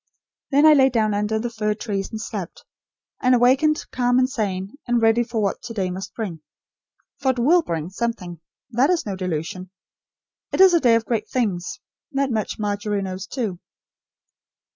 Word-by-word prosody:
Then 285 +2 +4
I 310 - +9
lay 270 -2 +5
down 220 -4 +1
under 210 +2 0
the 235 +2 -3
fir 210 -2 -1
trees 200 -3 -3
and 220 - -6
slept; 200 -5 -6 0.6
and 255 0 +4
awakened 265 +6 +3
calm 245 -1 +2
and 255 0 +4
sane, 200 -7 -3
and 240 0 +2
ready 225 +1 +4
for 230 -1 -3
what 200 - -1
to 230 - -8
day 190 -3 -1
must 190 +2 -7
bring. 195 -8 -4 0.8
For 270 - +1
it - - -14
WILL 310 +9 +4
bring 165 - -4
something. 195 -6 -4 0.3
That 250 +6 +3
is 360 -2 +1
no 200 -3 -3
delusion. 180 0 -4 0.8
It - - -2
is 380 -1 +8
a 340 - +5
day 240 -6 +4
of 230 -1 0
great 220 -3 -2
things. 200 -9 -2 0.3
That 275 -1 0
much, 220 -2 -2
Margery 205 -1 -2
knows, 185 0 -5
too." 215 -9 -3
220 Hz, 180 wpm, -22 LUFS, 195-250 Hz, 0.8 s, I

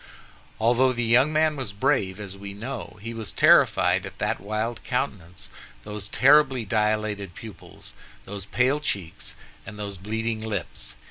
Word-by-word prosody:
Although 125 +3 +3
the 120 -1 -2
young 125 +6 +4
man 155 0 +2
was 130 -8 -4
brave, 105 -4 +1
as 100 -2 -7
we 100 0 -8
know, 120 +1 -6
he 115 +1 -5
was 115 -2 -5
terrified - - +5
at - - -9
that - - -1
wild 110 +3 -3
countenance, 100 -10 -4 0.3
those 105 -1 -5
terribly 135 0 +4
dilated 105 -2 -1
pupils, 110 -5 -10 0.3
those 100 -1 -6
pale 130 +6 +2
cheeks, 100 - -4 0.3
and 105 - -9
those 100 -3 -5
bleeding 110 +2 -2
lips. 90 - -5
110 Hz, 145 wpm, -25 LUFS, 100-125 Hz, 0.3 s, terrified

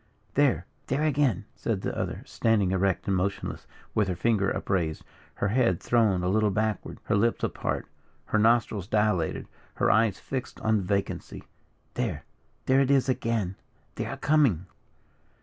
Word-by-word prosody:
"There - - +2 0.2
there 135 +4 0
again!" 135 - +1
said 110 -5 -2
the - - -3
other, - - -3
standing 105 -5 +1
erect 95 0 0
and 100 - +2
motionless, 95 +2 -2 0.3
with 105 -2 +2
her 90 - -1
finger 100 +1 +2
upraised, 85 -5 -1 0.3
her 100 - 0
head 110 -6 +2
thrown 110 -7 +2
a - - 0
little 105 +3 +3
backward, 110 0 -2
her 110 - 0
lips 115 +3 +1
apart, - - -2 0.4
her 110 - +1
nostrils 110 -3 +2
dilated, 105 -6 +1 0.3
her - - +3
eyes 110 -1 +3
fixed 130 -2 -5
on 110 -2 +2
vacancy. 100 +1 -3 0.5
"There - - -2 0.4
there 130 +1 +4
it 135 - +1
is 135 -1 +3
again 115 -7 -1 0.4
they - - -4
are - - -5
coming!" 140 - +3
105 Hz, 150 wpm, -27 LUFS, 95-115 Hz, 0.5 s, there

